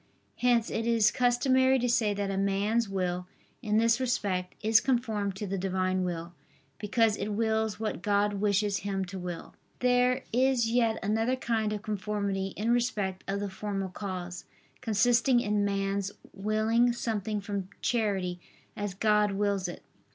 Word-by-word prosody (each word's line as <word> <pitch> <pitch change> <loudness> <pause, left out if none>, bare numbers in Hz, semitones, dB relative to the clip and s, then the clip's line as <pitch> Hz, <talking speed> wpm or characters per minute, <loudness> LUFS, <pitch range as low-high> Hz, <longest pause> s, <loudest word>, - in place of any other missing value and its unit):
Hence 240 -2 +2
it 225 +1 -2
is 230 -2 +4
customary 260 +2 +3
to 245 -1 0
say 235 -3 +2
that 200 -1 -2
a - - -2
man's 200 +3 +1
will, 180 -2 -2 0.3
in 215 -3 +1
this 230 +2 +3
respect, 200 -8 -1
is 220 +1 +6
conformed 220 -6 0
to 205 - -4
the 195 0 -3
Divine 185 0 0
will, 170 -1 -4 0.5
because 220 0 +2
it 210 +1 -3
wills 220 -1 0
what 220 -5 -3
God 205 0 +2
wishes 205 -1 +2
him 195 0 -2
to 190 +1 -7
will. 175 -2 -6 0.2
There 250 0 +2
is 255 -1 +3
yet 230 -2 +2
another 225 +5 +1
kind 225 -4 -1
of 210 -1 -4
conformity 200 -2 -2
in 220 +3 0
respect 210 -6 0
of 200 +1 -2
the 205 - -2
formal 195 -1 -3
cause, 180 -2 -6 0.4
consisting 240 +3 +3
in 210 -3 0
man's 200 0 -1 0.2
willing 220 +4 +2
something 215 -3 -2
from 200 -2 -4
charity, 195 -6 0 0.4
as 205 -3 -4
God 210 0 +2
wills 200 -1 0
it. 175 - -8
210 Hz, 155 wpm, -29 LUFS, 195-230 Hz, 0.5 s, is